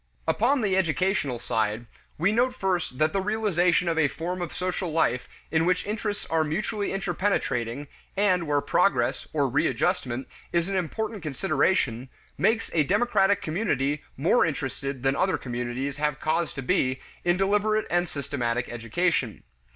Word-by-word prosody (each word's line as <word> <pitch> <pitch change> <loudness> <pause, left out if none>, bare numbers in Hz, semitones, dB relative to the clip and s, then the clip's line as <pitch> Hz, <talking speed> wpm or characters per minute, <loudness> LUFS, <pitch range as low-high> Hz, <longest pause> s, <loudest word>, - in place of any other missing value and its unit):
Upon 240 - +2
the 195 -4 +1
educational 185 -6 +1
side, 110 0 -1 0.3
we 180 +6 +2
note 250 +3 +2
first 180 - -1
that 155 +2 +2
the 195 - +1
realization 190 -4 +2
of 165 -1 +1
a 150 - +4
form 175 +5 -4
of 175 - -3
social 180 -1 -2
life 125 -6 +1 0.2
in 160 0 +3
which 180 +1 +1
interests 210 0 -3
are 160 -1 +3
mutually 205 +6 -2
interpenetrating, 145 - -1 0.3
and 185 -5 +2
where 145 -1 +2
progress, - - +1
or - - +1
readjustment, 125 +1 0 0.2
is 170 0 +1
an 195 - -2
important 210 +4 -2
consideration, 140 - 0 0.3
makes 225 0 +1
a 160 - +4
democratic 200 +2 +2
community 150 - 0
more 170 - +4
interested 140 -3 -3
than 135 0 +2
other 185 +4 +1
communities 125 +3 -3
have 150 -1 -1
cause 160 +1 0
to 135 - -4
be 130 +1 +1 0.2
in 175 0 +2
deliberate 210 +3 +2
and 175 0 +1
systematic 125 -4 -2
education. 120 - -1
165 Hz, 150 wpm, -26 LUFS, 135-195 Hz, 0.3 s, a